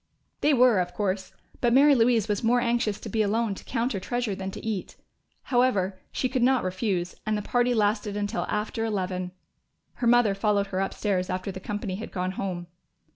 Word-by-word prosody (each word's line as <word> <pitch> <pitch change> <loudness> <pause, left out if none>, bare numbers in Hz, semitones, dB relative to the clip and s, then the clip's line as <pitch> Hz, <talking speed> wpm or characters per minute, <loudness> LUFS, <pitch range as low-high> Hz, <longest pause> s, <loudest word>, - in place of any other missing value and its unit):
They 295 - +3
were, 245 -5 +5
of 180 0 -2
course; 190 -1 -2 0.3
but 240 -1 +2
Mary 285 +3 +7
Louise 230 -3 +3
was 210 0 -1
more 240 +2 +4
anxious 235 -3 0
to - - -7
be 220 - 0
alone 215 +1 +1
to - - -10
count 240 0 -1
her 195 - -2
treasure 240 +2 -2
than 190 0 -4
to 195 - -8
eat. 215 -4 -3 0.5
However, 205 -7 +1
she 255 - 0
could 255 0 -1
not 260 +1 +3
refuse, 185 -1 -1
and 215 0 0
the 210 - -4
party 245 +2 +1
lasted 210 -1 +1
until 205 0 -2
after 215 +2 -2
eleven. 185 -4 -2 0.7
Her 240 - 0
mother 240 -3 +5
followed 200 0 +1
her 185 - 0
upstairs 195 -1 -1
after 185 +2 -3
the 190 - -7
company 205 -1 -4
had 220 - -7
gone 185 0 -2
home. 185 -2 -4
210 Hz, 195 wpm, -26 LUFS, 190-240 Hz, 0.7 s, Mary